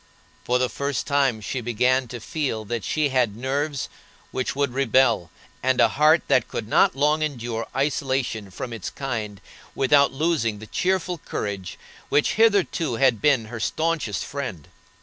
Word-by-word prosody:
For 125 - +2
the 125 0 +1
first 140 +1 -3
time 135 -6 +1
she 125 +4 -3
began 125 +2 +1
to 120 +1 -7
feel 115 -4 -3
that 115 0 -3
she 150 +5 0
had 125 -6 +1
nerves 140 +3 -2 0.4
which 130 - -2
would 140 -3 0
rebel, 125 -8 +2 0.3
and 130 0 +1
a - - +6
heart 155 +3 +4
that 125 - +3
could 110 - -5
not 110 - +4
long 150 +3 +2
endure 120 -6 -3
isolation 135 -6 -1
from 115 +6 -6
its 110 -5 -5
kind 110 -7 -4 0.4
without 140 +1 +4
losing 135 -7 0
the 110 - -10
cheerful 180 - -1
courage 100 -8 -5 0.3
which 145 - +2
hitherto 200 - +2
had 125 -3 +3
been 140 -7 +3
her 110 +1 -7
staunchest 155 -4 -1
friend. 130 - -6
130 Hz, 155 wpm, -24 LUFS, 115-145 Hz, 0.4 s, a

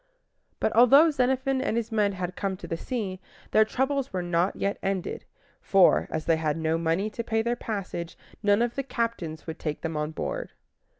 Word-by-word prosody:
But - - +1
although 275 +7 +7
Xenophon 265 0 +1
and 225 - 0
his 230 0 -2
men 210 -2 +2
had 180 -1 -4
come 195 -1 -2
to 175 - -9
the 165 - -2
sea, 195 -1 -4 0.3
their 215 - +6
troubles 265 +4 -1
were 185 -2 -2
not 175 +2 +1
yet 200 +1 -2
ended; 195 -2 -3 0.4
for, 195 -2 +4
as 160 0 -3
they 165 -1 +3
had 155 -1 -1
no 160 0 0
money 165 +5 0
to 235 - -4
pay 225 -1 0
their 235 +1 0
passage, 190 -7 -5 0.2
none 205 +2 +3
of 240 0 -1
the 275 - -2
captains 230 -11 -3
would 160 - -6
take 150 -2 -3
them 165 -1 -3
on 150 0 -1
board. - - -4
200 Hz, 195 wpm, -27 LUFS, 170-235 Hz, 0.4 s, although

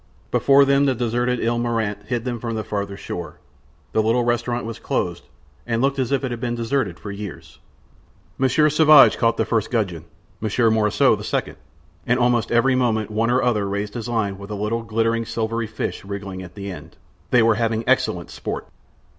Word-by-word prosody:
Before 140 0 +5
them 140 +1 +3
the 130 - +2
deserted 120 +1 0
Ile 120 +1 +1
Marante 110 -4 -2
hid 120 0 -2
them 120 -2 -3
from 115 0 -4
the 110 - -2
farther 100 -1 -4
shore. 85 -3 -6 0.5
The 110 - +2
little 115 +3 +2
restaurant 120 0 -1
was 115 -1 -6
closed, - - -2 0.4
and 115 -1 0
looked 135 +2 +1
as 130 -1 -1
if 140 0 +1
it 130 - -2
had 120 - -4
been 120 0 -2
deserted 115 -5 -1
for 100 - -7
years. 100 -7 -9 0.8
Monsieur 135 +4 +3
Sauvage 150 -1 +6
caught 115 -1 +2
the - - +1
first 115 -2 0
gudgeon, 95 -9 -2 0.3
Monsieur 110 +1 +2
Morissot 105 -1 +3
the - - -7
second, - - -2 0.5
and 125 +2 +2
almost 120 -2 +2
every 120 +3 +3
moment 110 -4 0
one 110 +2 +1
or 125 +2 +2
other 105 -5 +1
raised 100 +1 -3
his 120 0 -5
line 105 -5 -1
with 100 +1 -9
a 105 - -4
little, 105 +3 -2
glittering, 115 +1 0
silvery 115 0 -2
fish 110 - -4
wriggling 100 -1 -6
at 90 -2 -11
the 100 -1 -6
end; 90 - -11 0.3
they 120 -2 +4
were 115 0 +5
having 115 0 0
excellent - - +1
sport. - - -5
115 Hz, 195 wpm, -22 LUFS, 105-120 Hz, 0.8 s, Sauvage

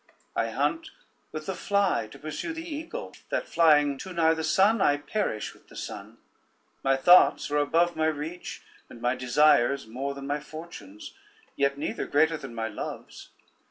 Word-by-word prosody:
I - - 0
hunt 325 0 -1 0.4
with 155 0 -6
the 190 - -2
fly 200 - +1
to - - -13
pursue 155 - -5
the 325 +1 -7
eagle, 325 +10 -6 0.2
that - - -2
flying 150 -4 +4
too 185 - -7
nigh 165 -1 +3
the 160 0 -3
sun, 195 +7 +3
I 145 -4 +4
perish 145 - -3
with - - -23
the - - -16
sun; - - -7 0.7
my 135 0 +3
thoughts 175 +1 +5
are 150 - +2
above 165 +4 +2
my 160 0 +1
reach, 160 +3 -5 0.3
and - - -12
my 120 +1 +1
desires 135 +1 +3
more 135 +5 -4
than 140 0 -7
my 145 +1 -1
fortunes, 170 - -10 0.4
yet 140 0 +1
neither 145 - -3
greater 160 +3 +3
than 135 -6 -8
my 115 -1 -2
loves. 105 - -7
155 Hz, 170 wpm, -27 LUFS, 140-180 Hz, 0.7 s, thoughts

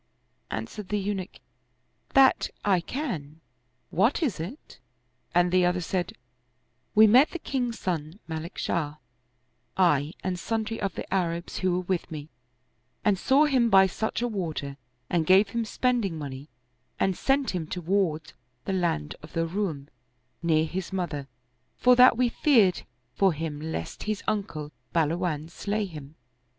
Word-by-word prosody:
Answered 210 -3 -5
the 210 - 0
Eunuch, 195 -2 -3 0.4
" - - -37
That 270 -1 +5 0.2
I 195 -3 +4
can! 165 - -5 0.5
What - - +2
is 235 - -1
it? 200 - -8 0.2
*' - - -31
and 175 0 +4
the 185 0 +4
other 180 0 +2
said, 180 0 -2 0.4
" 125 0 -45
We 215 +1 +9
met 250 +8 +6
the - - -5
king's 250 -7 -2
son, 165 0 -3
Malik 160 +2 -6
Shah, 150 -3 -1 0.8
I 155 -4 +3
and 180 -1 -2
sundry 225 +3 -2
of 195 -3 -2
the - - -4
Arabs 170 -2 -1
who 185 -1 +1
were 180 - -3
with 180 -1 -1
me, 155 -1 -7 0.8
and 205 -3 +3
saw 275 +8 +4
him 255 -5 +3
by 195 -2 +7
such 210 +3 -2
a - - +1
water 160 -10 -3 0.3
and 170 +3 +1
gave 195 +2 +6
him 230 +2 -2
spending 230 -7 0
money 140 -1 -7 0.5
and 190 -1 +2
sent 270 +4 +1
him 175 -4 -3
toward 175 -3 -1 0.3
the 195 - -1
land 170 - 0
of 155 - -13
the 165 0 0
Roum, 165 -6 -3 0.5
near 160 -2 +3
his 180 +3 -4
mother, 165 -7 -3 0.5
for 250 0 +5
that 250 -1 +7
we 250 0 +3
feared 230 -7 +3 0.3
for 195 -3 +3
him 155 -1 -4
lest 155 - -5
his 215 -1 -2
uncle 160 -8 -2 0.2
Bahluwan 160 -1 0
slay 210 +3 -2
him." 150 -5 -10
185 Hz, 155 wpm, -27 LUFS, 160-215 Hz, 0.8 s, We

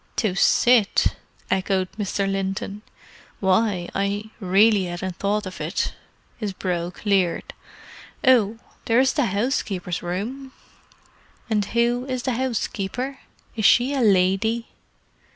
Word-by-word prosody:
"To 215 -6 0
sit?" 230 +2 +3 0.4
echoed 190 -1 0
Mr. 200 -1 -2
Linton. 195 +1 -3 0.6
"Why, 190 -2 +1
I 200 +2 -2
really 200 +1 +4
hadn't 175 +1 -5
thought 205 +1 0
of 185 - -7
it." - - -2 0.4
His 210 -4 -3
brow 175 -2 -2
cleared. 190 -2 0 0.7
"Oh—there 230 -1 +2
is 265 0 +3
the 285 -5 +1
housekeeper's 200 - -1
room." 235 +10 -5 1.0
"And 210 -2 +2
who 235 +3 +1
is 255 -2 -3
the 260 - 0
housekeeper? 250 +1 -3 0.4
Is 215 -3 -1
she 250 +6 +5
a 275 - 0
lady?" 205 +3 +2
205 Hz, 115 wpm, -23 LUFS, 190-235 Hz, 1.0 s, she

